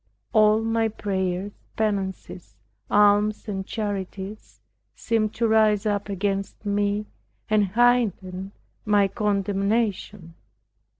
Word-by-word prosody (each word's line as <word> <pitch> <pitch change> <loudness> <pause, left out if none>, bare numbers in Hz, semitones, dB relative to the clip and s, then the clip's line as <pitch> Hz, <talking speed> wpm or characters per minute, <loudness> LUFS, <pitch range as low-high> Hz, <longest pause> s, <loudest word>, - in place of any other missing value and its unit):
All 215 0 +5
my 225 0 +1
prayers, 190 -2 -2 0.3
penances, 190 - -3 0.3
alms 210 +1 +3
and 195 -2 -4
charities, 205 -1 -5 0.4
seemed 215 -2 -1
to 230 - +1
rise 215 -2 +3
up 205 -1 -1
against 195 +1 -3
me, 205 +1 0 0.5
and 210 -1 +4
heighten 200 -4 +1 0.3
my 205 -2 +3
condemnation. 200 -2 -1
205 Hz, 95 wpm, -24 LUFS, 195-215 Hz, 0.5 s, All